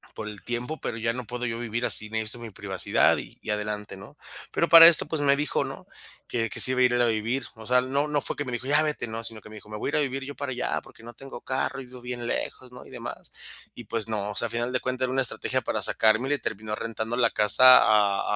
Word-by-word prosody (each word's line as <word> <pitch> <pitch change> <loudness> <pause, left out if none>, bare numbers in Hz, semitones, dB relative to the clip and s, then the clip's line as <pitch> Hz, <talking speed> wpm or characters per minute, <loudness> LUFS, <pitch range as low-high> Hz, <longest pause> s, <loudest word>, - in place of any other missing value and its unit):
por 105 -1 -6
el 105 -2 -9
tiempo, 120 +6 -4
pero 115 - -4
ya 115 0 -1
no 125 0 -6
puedo 125 0 -4
yo 115 0 -3
vivir 120 0 -3
así, 110 -2 0
necesito 110 +1 -4
mi 115 - -8
privacidad 95 -2 +1
y - - -9
y - - -9
adelante, 105 -1 -4
¿no?, 105 +10 -13 0.3
pero 170 - 0
para 165 0 +11
esto, 170 - +5
pues, 160 -1 -2
me 140 -1 +4
dijo, 150 - -1
¿no?, - - -9 0.4
que 115 -2 -1
que - - -5
se 130 - +8
iba 130 - -1
a - - +6
ir 125 -1 +3
él 120 - +2
a - - +4
vivir, 115 +3 -1
o 110 -1 -11
sea, 125 0 +4
no 140 +3 -1
no 150 -1 0
fue - - -4
que 145 - -3
me 125 - -5
dijo: 120 +3 -5
¡Ya 145 +2 +4
vete!", 150 -5 -3
no, 115 +1 -6
sino 110 -1 -7
que 105 - -14
me 110 - -11
dijo: 105 0 -13
"Me 105 - -6
voy - - -3
a - - -4
ir 160 - -2
a 150 - +3
vivir 135 -1 -3
yo 145 +1 -8
para 140 -2 -5
allá 125 - -2
porque 115 - -17
no 120 - -10
tengo 135 -2 -11
carro 135 +1 -3
y - - -10
vivo 125 0 -12
bien 125 -1 -6
lejos", 125 +1 -4
¿no?, 125 - -12
y - - -15
demás, - - -9 0.4
y 120 - -9
pues 110 0 -2
no, 105 -1 -2
o - - -8
sea, 120 - -1
al - - -8
final 120 +1 -2
de 125 - +1
cuenta 130 0 -3
era 130 - -4
una 135 - +1
estrategia - - -1
para - - -3
sacarme 110 +3 +2
y - - -1
le 145 - +1
terminó 105 0 -4
rentando 115 +1 -4
la 120 -2 +3
casa 125 +5 +7
a 105 -2 +3
120 Hz, 290 wpm, -26 LUFS, 110-130 Hz, 0.4 s, para